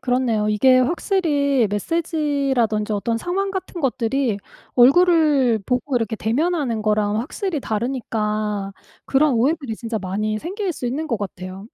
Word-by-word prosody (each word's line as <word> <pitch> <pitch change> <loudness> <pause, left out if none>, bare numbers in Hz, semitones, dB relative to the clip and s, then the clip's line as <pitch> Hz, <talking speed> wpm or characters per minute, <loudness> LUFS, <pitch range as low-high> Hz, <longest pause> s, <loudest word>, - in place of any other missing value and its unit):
그렇네요. 245 -4 0
이게 255 +5 +4
확실히 285 - +1
메시지라든지 275 - 0
어떤 230 +3 -1
상황 390 +7 -2
같은 375 -2 -5
것들이 255 -3 0 0.4
얼굴을 280 -3 +5
보고 250 +1 0
이렇게 225 -2 -1
대면하는 250 0 -1
거랑 210 0 +1
확실히 355 - -3
다르니까 215 -4 -2 0.3
그런 280 0 +3
오해들이 270 0 0
진짜 225 0 -4
많이 210 +3 -2
생길 380 - -3
수 255 - -5
있는 295 +6 -3
것 230 -5 -1
같아요. 190 0 -7
250 Hz, 325 characters per minute, -21 LUFS, 215-300 Hz, 0.4 s, 얼굴을